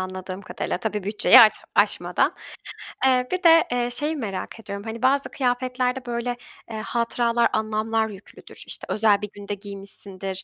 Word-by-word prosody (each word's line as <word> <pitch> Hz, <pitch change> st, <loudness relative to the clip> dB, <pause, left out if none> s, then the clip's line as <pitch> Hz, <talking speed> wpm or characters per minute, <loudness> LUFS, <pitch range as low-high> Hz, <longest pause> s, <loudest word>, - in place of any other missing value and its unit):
anladığım 185 Hz, +1 st, -6 dB
kadarıyla. -, -, -4 dB
Tabii, 210 Hz, -2 st, -3 dB
bütçeyi 210 Hz, +5 st, +6 dB
aç 220 Hz, -2 st, +8 dB, 0.2 s
aşmadan. -, -, +2 dB, 0.7 s
Eee, 250 Hz, -1 st, +3 dB
bir 370 Hz, 0 st, -2 dB
de, 330 Hz, -1 st, +7 dB
eee, 245 Hz, -1 st, 0 dB
şeyi 295 Hz, +5 st, -1 dB
merak 220 Hz, -5 st, -5 dB
ediyorum. 200 Hz, -2 st, -7 dB
Hani, 225 Hz, +1 st, -6 dB
bazı 275 Hz, +2 st, +2 dB
kıyafetlerde 255 Hz, 0 st, -1 dB
böyle, 240 Hz, 0 st, -3 dB, 0.3 s
eee, 220 Hz, -, -4 dB
hatıralar, 235 Hz, 0 st, +1 dB
anlamlar 220 Hz, +1 st, 0 dB
yüklüdür, 200 Hz, -1 st, -12 dB
işte -, -, -5 dB
özel 210 Hz, -2 st, +3 dB
bir 210 Hz, -, -4 dB
günde 205 Hz, 0 st, -6 dB
giymişsindir, 195 Hz, -1 st, -7 dB
225 Hz, 150 wpm, -24 LUFS, 200-250 Hz, 0.7 s, aç